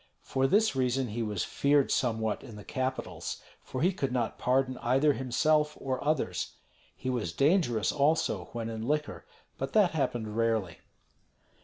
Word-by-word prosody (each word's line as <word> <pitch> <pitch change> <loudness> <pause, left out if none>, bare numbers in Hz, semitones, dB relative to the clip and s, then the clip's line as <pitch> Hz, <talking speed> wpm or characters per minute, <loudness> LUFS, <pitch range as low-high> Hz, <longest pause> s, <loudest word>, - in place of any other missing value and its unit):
For 135 0 +1
this 215 +3 +3
reason 130 -1 +1
he 115 +3 -3
was 105 -4 -1
feared 140 -1 +2
somewhat 110 -3 0
in 110 - -10
the 105 - -9
capitals, 130 -11 -3 0.2
for 130 - -4
he 185 +2 +3
could 135 -7 -2
not 120 -3 -1
pardon 130 0 +1
either 135 +5 +3
himself 150 +4 +1
or 130 -1 -2
others. 130 - -1 0.4
He 130 - -2
was 110 -9 -2
dangerous 140 - +2
also 140 - +1
when 115 -1 -4
in 115 0 -4
liquor; 150 - -2 0.3
but - - -3
that 205 -5 +5
happened 120 -8 -2
rarely. 110 -7 0
130 Hz, 155 wpm, -30 LUFS, 110-145 Hz, 0.4 s, that